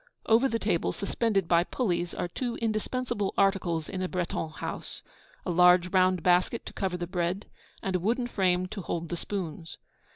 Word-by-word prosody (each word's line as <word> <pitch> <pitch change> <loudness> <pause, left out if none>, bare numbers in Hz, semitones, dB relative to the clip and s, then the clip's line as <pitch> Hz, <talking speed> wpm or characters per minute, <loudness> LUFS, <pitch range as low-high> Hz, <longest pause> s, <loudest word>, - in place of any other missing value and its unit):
Over 235 +4 +4
the 230 - 0
table, 205 -7 0
suspended 200 -2 0
by 170 0 +4
pulleys, 175 -5 -1
are - - -2
two 240 +7 -3
indispensable 220 -1 -2
articles 185 -5 +2
in 185 -1 -4
a 185 - 0
Breton 170 -3 -2
house, 155 - -6 0.4
a - - -1
large 180 +1 +6
round 185 -2 +3
basket 180 +6 +2
to - - -8
cover 190 -3 -2
the 175 - -3
bread, 180 +2 -2 0.4
and 190 -1 -1
a - - +2
wooden 235 +7 0
frame 185 -6 +1
to 210 0 -5
hold 170 -2 -3
the 175 - -2
spoons. 170 -3 -5
185 Hz, 175 wpm, -28 LUFS, 175-210 Hz, 0.4 s, large